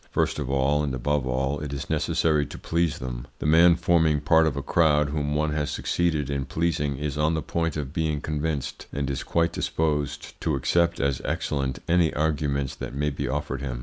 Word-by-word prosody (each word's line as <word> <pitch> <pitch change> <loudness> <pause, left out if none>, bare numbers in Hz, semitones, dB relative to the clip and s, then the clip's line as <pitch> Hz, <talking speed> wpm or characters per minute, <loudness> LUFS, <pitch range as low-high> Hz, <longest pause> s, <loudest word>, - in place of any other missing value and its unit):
First - - 0
of 70 -3 -3
all, 70 +2 +2
and 70 -3 -1
above 70 +1 0
all, 65 +3 -1
it 75 -2 -5
is 70 -1 -4
necessary 75 -2 +1
to - - -9
please 85 -3 0
them. - - -6
The - - -6
man 85 +3 +6
forming 80 -3 +3
part 80 +2 +4
of 70 -3 -1
a 70 - -3
crowd 75 -1 +3
whom 75 0 -1
one 75 0 +1
has 75 -1 -1
succeeded 80 -5 0
in 70 -1 -2
pleasing 75 -2 -1
is 75 0 -3
on 80 +2 +2
the 80 - -2
point 80 -2 -1
of 70 -2 -4
being 80 -3 0
convinced, 75 -2 -3
and 70 -1 -2
is 70 - -3
quite 85 0 0
disposed 75 -3 -2
to 80 - 0
accept 85 +6 +1
as 70 -2 0
excellent 70 -3 -2
any 85 -2 +3
arguments 75 -3 0
that - - -7
may 75 +1 0
be 70 - -3
offered 75 -1 -3
him. 65 -3 -4
75 Hz, 205 wpm, -25 LUFS, 70-80 Hz, -, man